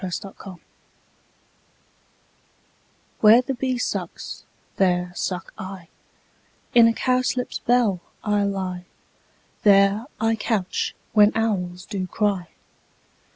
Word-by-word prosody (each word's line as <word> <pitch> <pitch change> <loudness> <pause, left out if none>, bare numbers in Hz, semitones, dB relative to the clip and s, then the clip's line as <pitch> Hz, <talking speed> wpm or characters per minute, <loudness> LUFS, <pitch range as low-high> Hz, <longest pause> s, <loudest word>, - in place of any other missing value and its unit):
Fairy 185 -2 -4
Land 195 - -10
iv 185 -3 -9 2.6
WHERE 220 +3 +7
the 270 - -2
bee 255 0 -2
sucks, 245 - -4 0.3
there 180 -2 +1
suck 180 0 -4
I: 185 -3 -8 0.8
In 235 -1 +7
a - - +4
cowslip's 255 0 0
bell 235 -6 +2 0.2
I 210 -1 +1
lie; 190 -2 -3 0.8
There 200 +3 +4
I 225 +1 +2
couch 205 -4 -1 0.2
when 210 -1 +6
owls 180 -5 -1
do 190 -3 -4
cry. 195 -3 -1
200 Hz, 105 wpm, -23 LUFS, 185-225 Hz, 2.6 s, WHERE